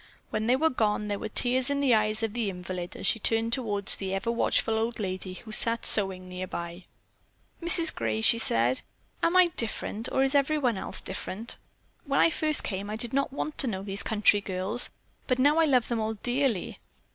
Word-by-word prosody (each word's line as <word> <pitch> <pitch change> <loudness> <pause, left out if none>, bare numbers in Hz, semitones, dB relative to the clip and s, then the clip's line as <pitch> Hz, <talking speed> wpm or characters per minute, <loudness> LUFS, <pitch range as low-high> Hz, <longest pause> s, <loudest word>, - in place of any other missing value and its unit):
When 215 +1 -2
they 250 - +4
were 320 +4 +1
gone, 210 -3 -1
there 205 -1 -3
were 220 - -5
tears 250 +4 0
in 280 0 -1
the 275 -3 +2
eyes 215 0 0
of 220 -2 -2
the 230 -4 -2
invalid 180 -1 -7
as - - -7
she 225 - +3
turned 225 +2 0
toward 210 -6 -1
the 195 -1 +4
ever 195 +4 -2
watchful 225 -1 0
old 230 +1 -3
lady 185 -2 -4
who 220 +3 -11
sat 230 +2 +1
sewing 190 -3 -1
nearby. 180 -1 -7 0.8
"Mrs. 335 -1 +7
Gray," 110 -1 -2
she 230 - +4
said, 120 - +2 0.4
"am 335 +2 +2
I 365 -1 +6
different 225 -1 -2
or 265 - +1
is 270 +1 +1
everyone 280 -4 +1
else - - +1
different? 200 +4 -6 0.5
When 275 -1 0
I 330 - +4
first 310 -1 +4
came 200 +1 -5
I 215 - -4
did 230 +2 -2
not 275 +1 0
want 300 +2 -5
to 270 - +3
know 190 -4 -4
these 195 0 -1
country 210 -1 +2
girls, 195 +5 +1 0.4
but 255 - +1
now 290 +5 +3
I 325 - +4
love 255 -6 +2
them 235 -2 -2
all 220 0 -2
dearly." 245 -2 -2
225 Hz, 205 wpm, -27 LUFS, 195-260 Hz, 0.8 s, Mrs